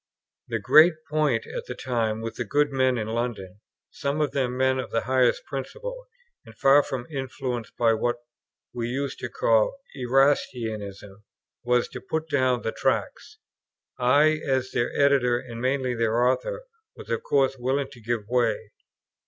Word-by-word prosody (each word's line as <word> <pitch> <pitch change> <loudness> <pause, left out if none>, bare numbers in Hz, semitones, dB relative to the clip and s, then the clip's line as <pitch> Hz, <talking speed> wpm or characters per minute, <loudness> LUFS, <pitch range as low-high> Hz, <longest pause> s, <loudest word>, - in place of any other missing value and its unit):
The - - -1
great 160 +2 +6 0.2
point 150 -7 +1
at - - -6
the 125 - -5
time 115 -4 -1
with 115 0 -6
these 120 - -3
good 145 +4 +2
men 130 -2 +2
in 110 -1 -3
London, 110 -5 -4 0.3
some 140 +2 -2
of 150 - +1
them 125 -2 -1
men 130 0 +2
of 125 - -4
the 115 - 0
highest 130 -1 +2
principle, - - -6 0.4
and - - -16
far 135 +2 +6
from 130 -4 -5
influenced 130 -4 -4
by 115 -1 +4
what 120 +2 0 0.6
we 120 -1 -3
used 135 +2 -3
to 125 - -4
call 115 - +2 0.2
Erastianism, 115 -7 0 0.4
was 125 0 +2
to - - -8
put 160 +4 -3
down 130 -4 +1
the 110 - -1
Tracts. - - -2 0.6
I, 145 +5 +4
as 130 -1 0
their 120 - 0
editor, 135 -4 +4
and 120 -2 -8
mainly 130 0 0
their 115 +1 +1
author, - - 0 0.3
was - - -10
of - - 0
course 135 -1 +1
willing 135 +2 -1
to 120 - -14
give 115 0 -1
way. 115 -3 0
125 Hz, 160 wpm, -25 LUFS, 115-140 Hz, 0.6 s, great